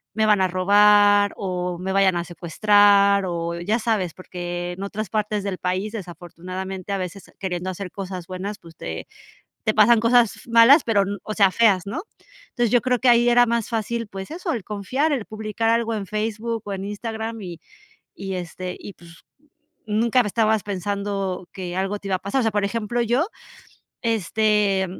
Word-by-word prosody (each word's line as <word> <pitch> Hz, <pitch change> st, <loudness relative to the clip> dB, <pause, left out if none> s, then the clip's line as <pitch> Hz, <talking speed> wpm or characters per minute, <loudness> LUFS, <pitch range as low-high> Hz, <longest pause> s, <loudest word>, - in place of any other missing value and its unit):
me 220 Hz, 0 st, +2 dB
van 210 Hz, -2 st, +4 dB
a 190 Hz, -, +3 dB
robar, 205 Hz, +2 st, +5 dB
o 180 Hz, -2 st, -3 dB
me 190 Hz, +1 st, -3 dB
vayan 195 Hz, -2 st, +3 dB
a 170 Hz, -, -1 dB
secuestrar, 200 Hz, +3 st, +3 dB
o 170 Hz, -1 st, -3 dB
ya 210 Hz, +7 st, 0 dB
sabes. 215 Hz, -7 st, -1 dB
Porque, 175 Hz, -1 st, -5 dB
en 190 Hz, +2 st, -7 dB
otras 205 Hz, +1 st, -4 dB
partes 210 Hz, -1 st, -1 dB
del 195 Hz, -2 st, -3 dB
país, 185 Hz, +4 st, -2 dB
desafortunadamente, 185 Hz, 0 st, -7 dB
a 195 Hz, -, -1 dB
veces 185 Hz, +1 st, -7 dB
queriendo 185 Hz, -1 st, -3 dB
hacer 185 Hz, +1 st, -6 dB
cosas 185 Hz, -3 st, -6 dB
buenas, 190 Hz, +3 st, -5 dB
pues, 165 Hz, -1 st, -15 dB
te 80 Hz, -, -6 dB, 0.6 s
te 215 Hz, -, +1 dB
pasan 225 Hz, +2 st, +6 dB
cosas, 230 Hz, -1 st, +3 dB
f -, -, -15 dB
malas, 235 Hz, +6 st, +7 dB
pero, 215 Hz, -3 st, +2 dB, 0.2 s
o 215 Hz, -, -4 dB
sea 200 Hz, -3 st, +4 dB
feas, 200 Hz, -3 st, +3 dB
¿no? 270 Hz, -, -4 dB, 0.5 s
Entonces, 240 Hz, -3 st, 0 dB
yo 245 Hz, -, +4 dB
creo 250 Hz, -1 st, 0 dB
que 260 Hz, -, +2 dB
ahí 240 Hz, 0 st, +5 dB
era 240 Hz, 0 st, +6 dB
más 235 Hz, -1 st, -1 dB
fácil, 230 Hz, 0 st, -2 dB
pues 195 Hz, +2 st, -8 dB
eso, 340 Hz, +2 st, -3 dB
el 230 Hz, -6 st, -4 dB
confiar, 250 Hz, -, -1 dB
el 245 Hz, -7 st, -2 dB
publicar 215 Hz, +1 st, -3 dB
algo 230 Hz, 0 st, +1 dB
en 205 Hz, -3 st, -4 dB
Facebook, 220 Hz, +2 st, -3 dB
o 205 Hz, -, -5 dB
en 195 Hz, 0 st, -4 dB
Instagram. 220 Hz, +2 st, -5 dB
Y 175 Hz, -3 st, -8 dB, 0.5 s
y, 195 Hz, -1 st, -5 dB
este, 180 Hz, +1 st, -5 dB
y 205 Hz, -, -9 dB
pues, 170 Hz, -1 st, -17 dB, 0.6 s
nunca 225 Hz, +3 st, +2 dB
estabas 220 Hz, -1 st, +1 dB
pensando 200 Hz, -1 st, -3 dB
que 180 Hz, -3 st, -5 dB
algo 195 Hz, +2 st, -1 dB
te 200 Hz, -, -8 dB
iba 190 Hz, -, +2 dB
a -, -, -3 dB
pasar. 200 Hz, +8 st, -1 dB
O -, -, +1 dB
sea, 225 Hz, -, +1 dB
por 205 Hz, -1 st, 0 dB
ejemplo, 230 Hz, +2 st, -2 dB
yo 240 Hz, +7 st, +1 dB, 0.8 s
este, 210 Hz, -2 st, +1 dB
205 Hz, 185 wpm, -23 LUFS, 185-225 Hz, 0.8 s, malas